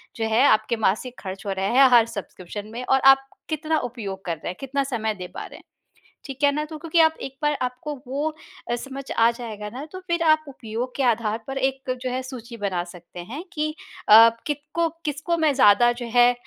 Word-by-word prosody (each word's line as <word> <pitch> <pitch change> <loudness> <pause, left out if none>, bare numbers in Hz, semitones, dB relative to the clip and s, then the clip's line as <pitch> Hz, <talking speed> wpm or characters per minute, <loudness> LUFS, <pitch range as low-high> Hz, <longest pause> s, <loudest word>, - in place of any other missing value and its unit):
जो 225 - -2
है 225 +4 +4
आपके 215 +2 +3
मासिक 220 +4 -1
ख़र्च 195 0 -7
हो 200 - -2
रहे 190 0 -1
हैं 270 -1 +8
हर 235 -2 +7
सब्सक्रिप्शन 205 -2 -7
में 245 - -5
और 265 - +3
आप 270 0 -7 0.2
कितना 310 0 0
उपयोग 200 -5 -7
कर 170 -2 -1
रहे - - -9
हैं, 180 - -3
कितना 275 +1 -1
समय 225 -5 -2
दे 180 -2 -7
पा - - -5
रहे - - -11
हैं। - - -17 0.6
ठीक 270 0 -8
है 285 - +6
ना 300 +1 -1
तो 310 0 -8
क्योंकि 330 +1 +1
आप 320 0 +5
एक 270 0 -7
बार 295 0 +2
आपको 255 +4 -4
वो 285 +4 -1 0.4
अ, 240 - +2
समझ 275 +2 -7
आ 230 0 +4
जाएगा 220 -3 -7
ना, 260 +6 -7
तो 370 +4 -9
फ़िर 340 -2 -1
आप 310 -1 +4
उपयोग 245 -1 -5
के 275 - 0
आधार 225 -2 +1
पर 270 0 -4
एक 265 0 -1
जो 255 - -2
है 255 +1 -2
सूची 245 -2 -9
बना 195 -5 -2
सकते 175 0 -11
हैं 235 - -7
कि 305 0 -2 0.4
आप 225 +2 +9
अ, 230 - -23
कितकों 300 +3 -1 0.2
किसको 300 +4 -1
मैं 310 -2 +3
ज़्यादा 240 -1 +6
जो 240 - -4
है 245 0 +6
250 Hz, 225 wpm, -24 LUFS, 220-285 Hz, 0.6 s, आप